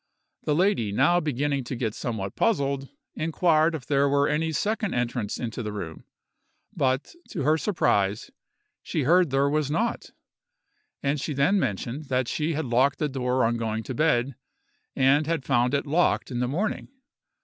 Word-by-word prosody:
The 150 - +1
lady 175 - +2
now 145 +11 +3
beginning 145 -3 -1
to 130 - -4
get 115 -3 -2
somewhat 100 -6 -4
puzzled, 140 -10 0 0.2
inquired 160 0 +2
if 145 - -7
there 140 -1 +2
were 140 +1 +3
any 160 +2 0
second 210 +5 -1
entrance 120 -3 -2
into 120 0 -4
the 105 -2 -4
room; 90 -6 -7 0.7
but, 130 +1 0 0.2
to 165 -9 -3
her 155 +3 +4
surprise, 105 - 0 0.5
she 155 - -2
heard 175 +4 +4
there 135 +1 +2
was 150 0 0
not; 225 +10 -1 0.9
and 140 0 0
she 150 0 -3
then 145 +9 +3
mentioned 120 - -3
that 130 -2 0
she 155 +5 -1
had 155 0 -2
locked 130 +3 +2
the 150 - -1
door 130 -2 0
on 120 +1 +1
going 110 -1 -2
to 130 - -5
bed, 135 -2 +1 0.6
and 140 +3 +3
had 160 -5 -1
found 125 0 +2
it 140 - -1
locked 155 -1 +1
in 120 - -2
the 125 - 0
morning. 185 +11 -2
140 Hz, 170 wpm, -26 LUFS, 125-155 Hz, 0.9 s, her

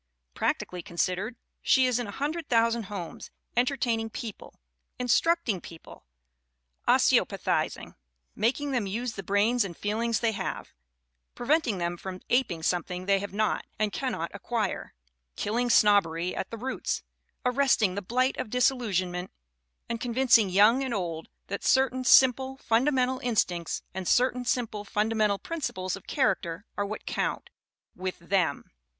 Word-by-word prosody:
Prac - - +1
tically 180 -1 -7
considered 185 +4 -2 0.3
she 260 -1 +4
is 250 -1 +1
in 240 - -3
a - - -6
hundred 300 +6 -3
thousand 230 -1 +2
homes, 185 -4 -7 0.3
entertaining 240 -3 +1
people, 220 -1 -8 0.4
instructing 250 - +2
people, 165 - -13 0.8
osteopathiz - - +2
ing, - - -11 0.4
making 265 +6 0
them 240 -6 0
use 230 +4 -3
the 195 - -6
brains 205 +5 +2
and 175 -4 -7
feelings 225 +2 0
they 230 -1 +1
have, 215 - -5 0.6
preventing 250 -4 +1
them 175 0 -2
from 185 +1 -7
aping 230 -10 +1
something 180 +1 -1
they 195 0 +3
have 200 +1 -5
not 215 +2 0
and 210 -1 0
cannot 250 -11 -2
acquire, 220 +2 -3 0.4
killing 240 +4 -1
snobbery 180 -6 +3
at - - -4
the 230 - -6
roots, 260 +4 -3 0.4
arresting 250 -6 +3
the 200 - -3
blight 255 +7 +1
of - - -4
disillusionment 195 -8 0 0.6
and 230 -1 -4
con 240 -2 -3
vincing 245 -6 +5
young 215 +8 +5
and 260 -3 -2
old 165 -4 -4 0.2
that 200 - -5
certain 260 -1 +3
simple, 260 +1 +5
funda 250 +3 +2
mental 260 -1 +1
instincts 185 - -1
and 185 -1 -4
certain 250 0 +3
simple, 230 -4 -1
fundamental 210 0 +1
prin 330 +10 -6
ciples 185 -8 -2
of 195 - -13
character 200 - 0
are 205 0 -1
what 215 - -6
count - - -2 0.4
with 185 0 -4
them. 170 -4 -1
220 Hz, 145 wpm, -28 LUFS, 190-250 Hz, 0.8 s, vincing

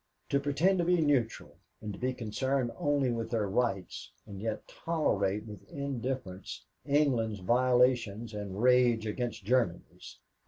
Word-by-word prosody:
To 140 - +2
pretend 155 +7 +2
to - - +3
be 175 +1 +3
neutral 140 -7 0 0.2
and 105 -1 -6
to - - -9
be 130 +1 0
concerned 125 +2 -1
only 145 -3 +1
with 115 -1 -3
their 110 -3 0
rights, 100 -3 -2
and 100 -2 -9
yet 110 -1 -3
tolerate 105 - -1
with 105 -3 -11
indifference 130 - -4 0.2
England's 125 -8 +2
violations 120 -1 +2
and 100 -2 -5
rage 120 -2 +4
against 115 -1 -3
Germany's." 115 -7 -1
120 Hz, 140 wpm, -31 LUFS, 105-135 Hz, 0.2 s, rage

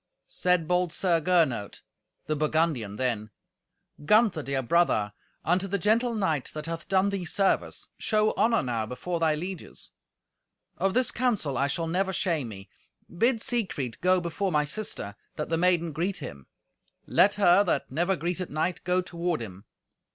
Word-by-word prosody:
Said 180 -3 +1
bold 180 0 +1
Sir 170 -2 +1
Gernot, 155 - +1 0.4
the 155 - -1
Burgundian, 150 -8 0
then, 115 -3 -1 0.7
"Gunther, 210 -1 +4
dear 135 -2 -2
brother, 120 -9 +2 0.3
unto 180 +3 +2
the 200 +1 0
gentle 230 +5 +2
knight, 160 - 0
that 155 0 -5
hath 165 0 -5
done 190 +1 +3
thee 195 -2 -2
service, 190 +3 0
show 215 -1 +2
honour 230 0 +2
now 115 -4 -2
before 170 +9 -4
thy 160 -2 +2
lieges. 180 +3 -7 0.9
Of 195 +2 +1
this 255 -1 +2
counsel 215 - 0
I 135 +3 +1
shall 165 +4 -2
never 190 +3 0
shame 165 -7 0
me. 95 -3 -9 0.5
Bid 230 +5 +2
Siegfried 175 - -2
go 185 +1 +4
before 180 +3 -2
my 150 -2 +2
sister, 150 - -4 0.2
that 150 - -4
the 165 - +1
maiden 170 -2 +2
greet 180 +6 -2
him. 70 - -8 0.6
Let 200 - +4
her, 195 -1 +5
that 145 -8 -1
never 175 +7 +1
greeted 175 +1 -3
knight, 160 +4 -2
go 180 0 +2
toward 175 -1 -2
him. 100 -3 -8
170 Hz, 160 wpm, -27 LUFS, 145-190 Hz, 0.9 s, her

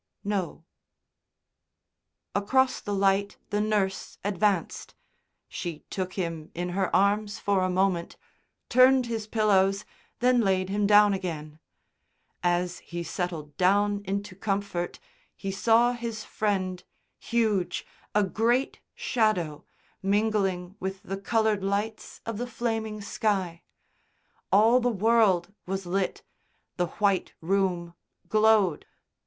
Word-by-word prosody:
"No." 190 -5 -3 1.7
Across 260 +6 +2
the 205 - -4
light 195 +1 +1
the 205 0 +1
nurse 205 -3 -1
advanced. 200 -2 -1 0.5
She 165 -3 -6
took 185 -1 -3
him 165 -4 -4
in 175 +1 -2
her 190 +1 0
arms 205 +1 +2
for 200 -2 +1
a 185 - +1
moment, 185 -2 0 0.5
turned 255 +1 +5
his 225 -2 -4
pillows, 200 -3 +2 0.3
then 250 0 +4
layed 190 -2 +1
him 205 +1 +1
down 205 0 +6
again. 160 -5 -5 0.8
As 175 0 0
he 170 0 -6
settled 165 -5 -4
down 205 +2 +3
into 200 0 -4
comfort 195 -3 -2 0.4
he 195 - -4
saw 230 +4 +4
his 230 -3 -5
Friend, 185 -5 -2 0.4
huge, 220 -6 0 0.3
a 210 - +5
great 235 +6 +1 0.2
shadow, 215 - 0 0.4
mingling 195 -3 0
with 190 +2 -5
the 195 -1 -4
coloured 215 0 +1
lights 205 +3 -3
of 225 -2 -4
the 245 - -3
flaming 225 -2 -3
sky. 195 -5 -1 0.9
All 225 +5 +6
the 245 0 +1
world 210 -4 +3
was 190 0 -3
lit, 185 +2 -1 0.5
the 175 -1 +1
white 200 +1 0
room 175 -1 0 0.3
glowed. 215 -6 +3
200 Hz, 115 wpm, -27 LUFS, 185-215 Hz, 1.7 s, down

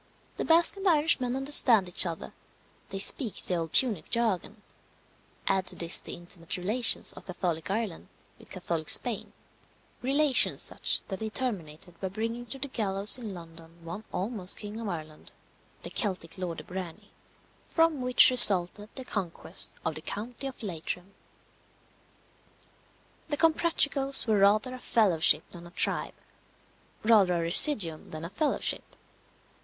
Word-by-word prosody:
The - - -3
Basque 335 +4 +3
and 390 - -7
the - - +6
Irishman 295 -6 +1
understand 265 -7 +5
each 180 0 +5
other 165 -1 -7 0.6
they 195 - -5
speak 215 +3 -1
the - - -3
old 165 -2 -3
Punic 215 -12 +1
jargon; 220 -2 -2 0.8
add 190 -1 0
to - - -5
this 170 -1 -2
the - - -8
intimate 175 -1 -6
relations 215 +7 +3
of - - -14
Catholic 175 -3 -4
Ireland 205 -4 -4 0.3
with - - -17
Catholic 170 -4 -4
Spain 230 -5 +3 0.7
relations 275 +2 +3
such - - +1
that 190 - -5
they 220 0 -4
terminated 180 - -6
by 190 - -2
bringing 230 +5 -5
to 270 - -6
the 270 - -3
gallows 205 -2 -1
in 215 -5 -7
London 165 0 -14
one 170 +6 -7
almost 195 -2 -4
King 210 +1 -8
of 230 - -6
Ireland, 155 -3 -9 0.5
the - - -8
Celtic 185 -7 -4
Lord 180 -3 -5
de - - -8
Brany; 180 -3 -9 0.5
from 325 -4 0
which 250 0 +5
resulted 205 -3 +6
the 260 - -7
conquest 190 -8 -4
of 160 - -1
the 155 - -7
county 235 - -6
of 260 -3 -10
Leitrim. 180 +1 -6 2.2
The 290 - -2
Comprachicos 295 -4 +2
were 215 -3 +1
rather 210 +6 +2
a 255 - -9
fellowship 195 -11 +3
than 175 -1 -12
a - - -13
tribe; 175 - -2 0.9
rather 210 -5 +4
a 170 - -1
residuum 170 - +3
than 155 +1 -8
a 170 - -8
fellowship. 305 +7 -1
205 Hz, 150 wpm, -27 LUFS, 175-250 Hz, 2.2 s, the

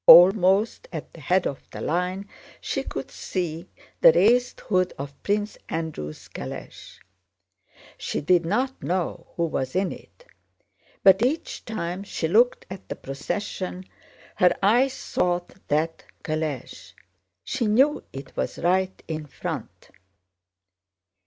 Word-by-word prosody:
Almost 190 +3 +7
at 160 -4 -6
the 165 - -12
head 180 +6 +2
of 135 - -3
the - - -8
line 180 +4 -1 0.3
she - - -2
could - - -6
see 175 -1 -4 0.3
the - - +9
raised 250 - +3
hood 185 -2 +1
of 140 0 -7
Prince 205 +1 -1
Andrew's 160 - -4
calèche. 65 - -8 1.0
She - - -2
did 175 +3 +3
not 250 +10 -1
know 180 -1 -2
who 170 - +1
was 135 -3 -2
in 190 0 +1
it, - - -13 0.8
but 190 +1 +7
each 270 +7 -1
time 185 -4 -3
she 195 -4 -2
looked 230 +8 +3
at 190 0 -9
the - - -3
procession 185 +6 -4 0.5
her 180 -1 +4
eyes 245 +6 +4
sought 175 -8 -1
that 160 +2 0 0.2
calèche. 155 -5 -4 0.5
She 255 -5 -1
knew 265 +8 +4
it 135 0 -9
was - - -2
right 185 +2 +1
in 155 -2 -4
front. - - -6
180 Hz, 125 wpm, -25 LUFS, 160-210 Hz, 1.0 s, the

